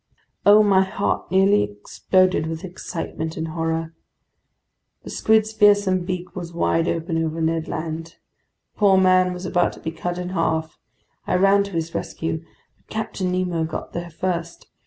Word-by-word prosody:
Oh, 210 +1 +8
my 195 -2 +4
heart 190 +1 -2
nearly 195 +2 +4
exploded 155 - +1
with 160 0 -5
excitement 165 -2 -5
and 160 0 -3
horror! 165 0 -2 1.1
The - - -8
squid's 220 0 +2
fearsome 205 -4 +4
beak 180 -1 -5
was 170 -2 -7
wide 165 0 +1
open 165 0 -1
over 160 0 -3
Ned 160 0 0
Land. 165 +1 -5 0.6
The - - -30
poor 200 -3 +5
man 185 -1 +4
was 180 0 -6
about 175 -1 +1
to - - -13
be 160 - -4
cut 175 +2 -4
in 180 0 -4
half. 160 -3 -1 0.5
I - - +1
ran 195 +2 +5
to 200 - -9
his 165 0 -3
rescue. 160 0 -3 0.3
But - - -37
Captain 205 -4 -3
Nemo 180 -2 0
got 160 0 -5
there 170 0 -5
first. 170 0 -4
175 Hz, 160 wpm, -22 LUFS, 165-190 Hz, 1.1 s, Oh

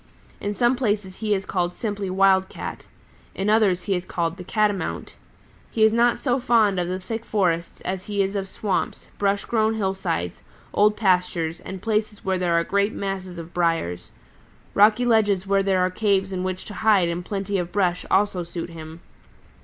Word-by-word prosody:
In 205 0 -3
some 240 +2 +3
places 205 -6 -1
he 215 -2 +1
is 190 0 -3
called 175 -2 -1
simply 205 -3 -3
Wild 190 0 +3
Cat. - - -7 0.5
In 195 +2 0
others 200 -5 +3
he 200 - 0
is 180 -1 -1
called 170 -2 -2
the 180 - -7
Catamount. 205 0 -1 0.6
He 220 - +1
is 220 0 +5
not 235 +1 +3
so 255 -1 0
fond 220 -6 +3
of 175 - -1
the 185 +1 -2
thick 225 +5 -5
forests 175 -7 -1
as 185 0 -4
he 205 -1 +1
is 195 +1 -3
of 195 -1 -2
swamps, 200 +1 -3
brush 200 0 +1
grown 220 -1 +1
hillsides, 190 - -2 0.3
old 210 +1 +3
pastures 180 -4 +1
and 190 -1 -8
places 215 -2 -1
where 190 -1 0
there 175 -2 +1
are 170 - +3
great 200 +4 +1
masses 190 -2 -4
of 165 +1 -9
briars. 165 - -1 0.6
Rocky 215 +4 +5
ledges 205 -5 +3
where 195 0 +2
there 190 -1 +2
are 185 0 +1
caves 195 -1 +1
in 185 -1 -2
which 185 0 -3
to 210 - -8
hide 210 -5 +4
and 170 +1 -3
plenty 195 0 -2
of 175 0 -4
brush 180 -3 +1
also 190 -2 +2
suit 170 0 -6
him. 160 0 -10
195 Hz, 185 wpm, -24 LUFS, 180-210 Hz, 0.6 s, is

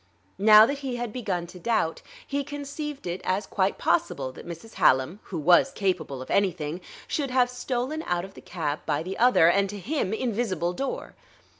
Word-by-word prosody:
Now 215 +1 +9
that 280 +4 -2
he 265 -3 -4
had 240 -3 -4
begun 190 -8 -2
to 180 +1 -12
doubt, 195 -6 0 0.2
he 280 0 -2
conceived 290 0 -6
it 175 +1 -3
as 190 +3 0
quite 195 -1 0
possible 295 - 0
that 130 - -12
Mrs. 175 +6 -9
Hallam 145 +6 +4
(who 180 - -5
was 175 - +5
capable 175 - -2
of - - -10
anything) 175 -4 0 0.3
should 285 -3 -1
have 250 -1 +2
stolen 250 +4 -2
out 175 0 0
of 195 - -13
the - - -12
cab 155 -4 -3
by 150 0 0
the 185 +3 -6
other 245 -8 +6
and, 195 +3 +3
to 205 - -6
him, 230 - -2
invisible 215 -7 -1
door. 270 +8 -4
200 Hz, 185 wpm, -26 LUFS, 175-250 Hz, 0.3 s, Now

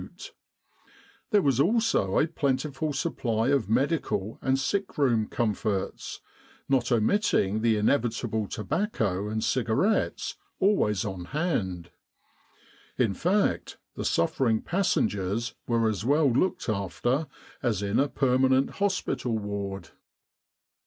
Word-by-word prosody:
There 205 -3 +3
was 135 -3 +2
also 185 - +2
a - - +4
plentiful 150 -1 -1
supply 115 -3 -1
of 135 -8 +1
medical 120 - 0
and 130 0 +2
sick 190 +8 -2
room 120 -7 +2
comforts, 105 -3 -2 0.5
not 130 -3 +1
omitting 110 - +2
the 115 -1 +3
inevitable 110 -1 0
tobacco 105 - -1
and 110 0 -2
cigarettes, 130 - 0 0.2
always 120 - +2
on 95 -3 -5
hand. 95 - -2 1.1
In 115 -6 +2
fact, 195 - 0 0.2
the - - -4
suffering 110 +6 +1
passengers 115 - 0
were 115 -2 +2
as 105 -2 -1
well 145 +2 +3
looked 160 +10 0
after 120 - -1 0.3
as 110 -5 0
in 100 +2 +1
a 140 +1 +2
per 130 -2 +1
manent 130 +1 +3
hospital 190 - -1
ward. 100 -4 -5
120 Hz, 110 wpm, -27 LUFS, 105-145 Hz, 1.1 s, a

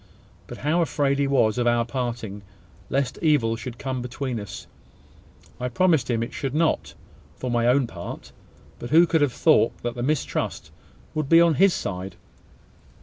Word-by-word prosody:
But - - -8
how 165 +4 +2
afraid 140 -4 0
he 140 - +2
was 125 -4 +2
of 120 - +1
our 120 0 +2
parting, 120 -5 -4 0.5
lest 135 -2 -1
evil 145 -8 +2
should 120 +1 -7
come 130 -1 -3
between 125 0 -4
us! 100 -2 -8 0.9
I 125 - -2
promised 155 -1 +2
him 115 -1 +1
it 115 - -7
should 135 0 -3
not, 165 +1 0 0.4
for 125 - -4
my 120 0 +2
own 130 +2 +4
part: - - -8 0.5
but 120 - -6
who 165 +4 +6
could 165 -2 +1
have 145 -3 +3
thought - - +3
that 120 0 -2
the 120 - -6
mistrust 145 +3 -2 0.4
would 155 -3 -2
be 165 - +7
on 170 -1 +5
his 190 +3 +4
side? 95 0 -5
130 Hz, 170 wpm, -24 LUFS, 120-150 Hz, 0.9 s, be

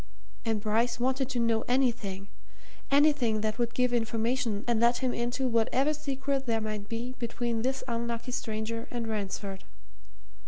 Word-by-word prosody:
And 225 -2 +1
Bryce 225 +4 +1
wanted 260 +1 +1
to 255 -3 -1
know 230 -1 +2
anything 235 -7 0 0.6
anything 280 -7 +4
that 215 +2 -1
would 235 -1 0
give 250 -1 +2
information 230 -1 0
and 235 -2 +3
let 235 +1 +4
him 255 -2 0
into 245 +3 0
whatever 250 +5 +2
secret 275 -2 -2
there 225 -1 +2
might 215 -1 -4
be 235 +2 -3
between 235 -1 -1
this 260 +2 -1
unlucky 235 +1 -2
stranger 230 -2 -3
and 235 -2 -3
Ransford. 200 -2 -3
235 Hz, 150 wpm, -30 LUFS, 220-255 Hz, 0.6 s, anything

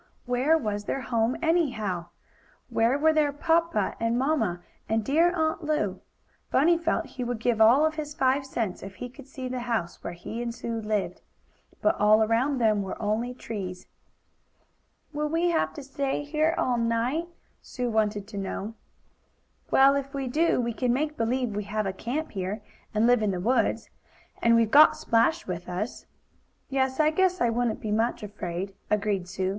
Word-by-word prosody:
Where 260 +6 +3
was 210 -7 -3
their 270 - -2
home, 230 0 0
anyhow? 230 - 0 0.6
Where 230 +4 +2
were 315 +2 +4
their 300 -2 +2
papa 325 - +1
and 230 +1 +1
mamma 255 - 0 0.3
and 220 -1 0
dear 330 +7 +4
Aunt 320 -1 -1
Lu? 305 0 -1 0.5
Bunny 335 +6 +4
felt 335 0 0
he 255 - -6
would 245 -1 -2
give 230 0 0
all 245 +8 +6
of 315 - +1
his 300 -1 -6
five 265 +1 +2
cents 230 -8 -3
if 195 0 -9
he 245 - -6
could 265 +2 -14
see 260 -1 -6
the 255 0 -3
house 230 -8 -3
where 170 - -4
he 215 +7 -6
and 235 -1 -4
Sue 230 -2 -4
lived. 210 -2 -2 0.6
But 320 - +2
all 215 +1 +5
around 240 +6 +1
them 215 -4 +2
were 190 -1 -5
only 225 +4 -1
trees. 190 -7 -6 1.3
"Will 300 0 -1
we 335 +2 +1
have 325 - +1
to 290 - -7
stay 275 0 -2
here 310 +2 +1
all 245 -2 +1
night?" 235 +8 0 0.3
Sue 250 -1 -4
wanted 210 -3 0
to 205 -3 -5
know. 195 +2 -4 1.0
"Well, 270 +1 +6
if 275 0 -3
we 270 -1 -2
do, 315 +5 +2
we 235 -1 -1
can 245 +2 0
make 300 +4 0
believe 235 -2 -1
we 210 -1 -3
have 215 0 -2
a 195 - -2
camp 265 +11 -4
here, 200 +2 -4 0.3
and 215 +1 +2
live 245 -1 +4
in 210 - +1
the 185 -2 -2
woods. 225 +2 0 0.5
And 230 0 +5
we've 230 -1 +3
got 300 +2 +7
Splash 235 +9 +2
with 180 -1 -5
us." 190 +7 -4 0.6
"Yes, 265 0 0
I 310 0 +4
guess 370 +2 +2
I 235 - +2
wouldn't 235 -1 -1
be 215 - -3
much 225 +1 0
afraid," 195 -2 -5 0.2
agreed 200 -3 0
Sue. 190 0 -2
240 Hz, 180 wpm, -27 LUFS, 215-285 Hz, 1.3 s, got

